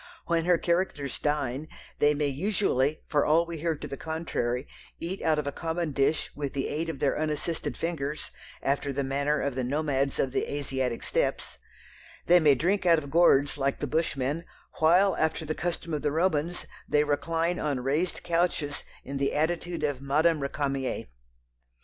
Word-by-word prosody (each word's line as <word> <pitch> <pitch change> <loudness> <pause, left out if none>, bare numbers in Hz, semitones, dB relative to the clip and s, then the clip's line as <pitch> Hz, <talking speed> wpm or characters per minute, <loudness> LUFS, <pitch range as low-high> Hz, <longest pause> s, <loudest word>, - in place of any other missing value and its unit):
When 165 -1 +1
her 175 -1 +5
characters 170 -6 -1
dine, 145 -1 -1 0.3
they 150 0 +4
may 150 0 0
usually, 150 -2 0
for 145 -2 +2
all 165 +3 +4
we 170 -1 -6
hear 165 0 0
to - - -7
the 140 - -6
contrary, 145 -6 -2 0.3
eat 180 +4 -4
out 160 -1 +2
of 150 - -1
a 145 - -1
common 165 +1 -2
dish 140 +3 +1
with 145 -2 -3
the 135 - -1
aid 160 +3 -2
of 160 - -4
their 135 +1 +1
unassisted 155 +2 -2
fingers, 155 -3 -3 0.3
after 140 +1 0
the 140 +1 -1
manner 140 +2 0
of 140 - -1
the 130 0 -2
nomads 140 0 0
of 135 - +1
the - - -1
Asiatic 130 -4 -2
Steppes; - - -1 0.7
they 175 +1 +7
may 150 -4 +5
drink 185 +9 +1
out 170 -2 +5
of 145 -3 -5
gourds 145 -4 +4
like 135 0 +1
the - - -1
Bushmen, 155 -1 -1 0.4
while, 180 +5 +5
after 160 0 0
the 155 - -1
custom 170 -1 -3
of 150 - -1
the 150 - 0
Romans, 165 +1 0 0.2
they 150 0 +4
recline 165 +4 0
on 145 -4 -1
raised 150 +8 -1
couches 170 -4 0 0.2
in 140 +1 -5
the 140 0 0
attitude 170 +1 -1
of 145 -3 -1
Madame 155 +4 +3
Récamier. 140 - -2
150 Hz, 175 wpm, -28 LUFS, 140-165 Hz, 0.7 s, they